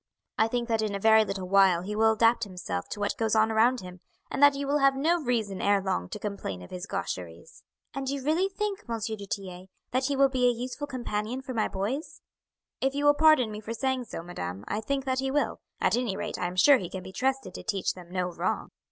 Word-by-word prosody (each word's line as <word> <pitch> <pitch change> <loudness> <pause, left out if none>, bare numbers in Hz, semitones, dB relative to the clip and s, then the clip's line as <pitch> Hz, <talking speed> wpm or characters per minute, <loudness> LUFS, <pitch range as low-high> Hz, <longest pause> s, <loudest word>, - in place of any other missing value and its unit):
I 220 - +5
think 240 +1 -2
that 225 -2 +1
in 210 -2 -1
a - - -3
very 220 +1 +6
little 195 -3 -4
while 190 -2 +4
he 210 +3 -4
will 220 +1 +4
adapt 230 +2 +3
himself 180 - -5
to - - -5
what 205 0 -1
goes 225 -1 +1
on 220 0 +4
around 235 +3 +3
him, 180 0 -10 0.3
and - - -2
that 285 -1 +7
you 280 0 -3
will 285 +2 +1
have 275 -1 +4
no 325 +5 +2
reason 225 -7 -1
ere 200 0 +3
long 90 - -2
to - - -5
complain 200 - -5
of - - -13
his 180 +1 -6
gaucheries." 85 -2 -6 0.3
"And 270 -1 -3
you 275 -1 -3
really 330 +7 +2
think, 400 0 -3
M. 230 -1 -2
du 215 -2 -4
Tillet, 185 -1 -6 0.2
that 255 +1 +1
he 280 +1 0
will 275 0 +5
be 255 -2 +2
a - - +2
useful 250 +5 -5
companion 245 -1 -3
for 260 - -5
my 220 -2 +1
boys?" 225 +11 -4 0.6
"If 270 +1 0
you 290 +1 0
will 290 - +7
pardon 300 -7 +5
me 210 - -6
for 220 +2 -5
saying 260 0 -1
so, 165 - -7
madam, 95 - -6
I 210 - -2
think 275 +4 -2
that 260 -1 0
he 265 0 -1
will 290 +2 0 0.2
at - - +2
any 235 -5 -1
rate - - -4
I 180 - 0
am 180 - -6
sure 270 +8 +6
he 180 - -5
can 190 -1 -6
be 190 +1 -10
trusted 265 +5 -1
to - - -7
teach 200 -4 -1
them 180 -2 -12
no 180 0 -2
wrong." - - -2
225 Hz, 245 wpm, -28 LUFS, 195-265 Hz, 0.6 s, that